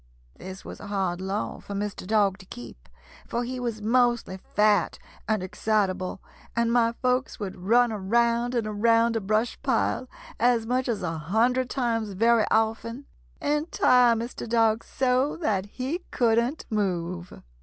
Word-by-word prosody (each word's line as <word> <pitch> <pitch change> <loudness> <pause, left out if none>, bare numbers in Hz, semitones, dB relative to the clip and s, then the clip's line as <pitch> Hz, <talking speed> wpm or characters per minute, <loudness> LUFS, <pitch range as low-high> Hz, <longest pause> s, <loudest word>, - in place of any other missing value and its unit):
This 190 +1 -9
was - - -8
a - - -9
hard 190 -3 -1
law 195 +2 -3
for 200 - -7
Mr. 200 -2 -4
Dog 205 -2 +2
to 185 - -14
keep, 115 - -11 0.4
for 235 - -2
he 255 +1 -4
was 230 -4 -4
mostly 235 -4 +1 0.2
fat 210 -3 +3 0.3
and 215 -4 0
excitable, 190 -1 -1 0.4
and 235 0 +1
my 230 -1 +3
folks 255 +1 0
would 195 -3 -5
run 230 +6 +3
around 235 +4 +1
and 235 -2 0
around 230 +2 +2
a 225 - 0
brush 215 +4 0
pile, 260 -1 0 0.3
as 235 -1 +3
much 250 +2 0
as 210 -5 -2
a 165 -2 -2
hundred 240 - +1
times 230 -5 -1
very 230 +3 +3
often, 225 +4 0 0.3
and 300 +3 -1
tire 245 -2 +5
Mr. 235 0 -5
Dog 225 -1 +2
so 260 +2 0
that 205 - -1
he 265 - -4
couldn't 235 +4 +1
move. 180 -4 -2
225 Hz, 155 wpm, -26 LUFS, 200-245 Hz, 0.4 s, tire